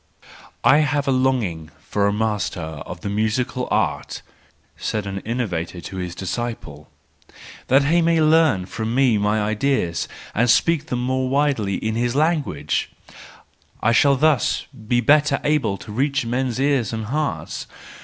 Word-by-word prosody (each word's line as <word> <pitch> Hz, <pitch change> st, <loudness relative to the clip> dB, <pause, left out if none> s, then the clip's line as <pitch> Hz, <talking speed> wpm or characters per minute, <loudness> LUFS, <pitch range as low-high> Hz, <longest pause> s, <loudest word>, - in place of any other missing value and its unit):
—"I 145 Hz, -, +6 dB
have 145 Hz, -1 st, 0 dB
a -, -, +3 dB
longing 120 Hz, -12 st, 0 dB
for 100 Hz, +6 st, -1 dB
a -, -, +2 dB
master 105 Hz, -3 st, -1 dB
of 80 Hz, +2 st, -7 dB
the -, -, -5 dB
musical* 115 Hz, +5 st, -1 dB
art," -, -, -1 dB, 0.5 s
said 105 Hz, -2 st, -3 dB
an 95 Hz, 0 st, -4 dB
innovator 95 Hz, -7 st, -3 dB
to 95 Hz, +3 st, -8 dB
his 90 Hz, -1 st, -4 dB
disciple, 95 Hz, -8 st, -5 dB, 0.4 s
" -, -, -17 dB
that 135 Hz, +2 st, +4 dB
he 165 Hz, +5 st, +3 dB
may 165 Hz, 0 st, +3 dB
learn 155 Hz, -, +4 dB
from 110 Hz, +4 st, -4 dB
me 125 Hz, -5 st, +3 dB
my 105 Hz, +1 st, +1 dB
ideas 105 Hz, -4 st, 0 dB, 0.3 s
and 120 Hz, +3 st, +2 dB
speak 160 Hz, +4 st, +3 dB
them 125 Hz, 0 st, -2 dB
more 130 Hz, 0 st, 0 dB
widely 135 Hz, -8 st, +1 dB
in 110 Hz, +3 st, -2 dB
his 120 Hz, +2 st, -1 dB
language: 145 Hz, -, 0 dB, 0.9 s
I 115 Hz, -, +2 dB
shall 140 Hz, +4 st, +4 dB
thus 150 Hz, -1 st, +2 dB, 0.2 s
be 120 Hz, +1 st, +2 dB
better 150 Hz, +5 st, +4 dB
able 135 Hz, -10 st, +1 dB
to 105 Hz, -, -11 dB
reach 135 Hz, +3 st, 0 dB
men's 125 Hz, +1 st, -1 dB
ears 135 Hz, -6 st, +1 dB
and 110 Hz, -1 st, -3 dB
hearts. 150 Hz, +6 st, -3 dB
120 Hz, 155 wpm, -21 LUFS, 105-140 Hz, 0.9 s, I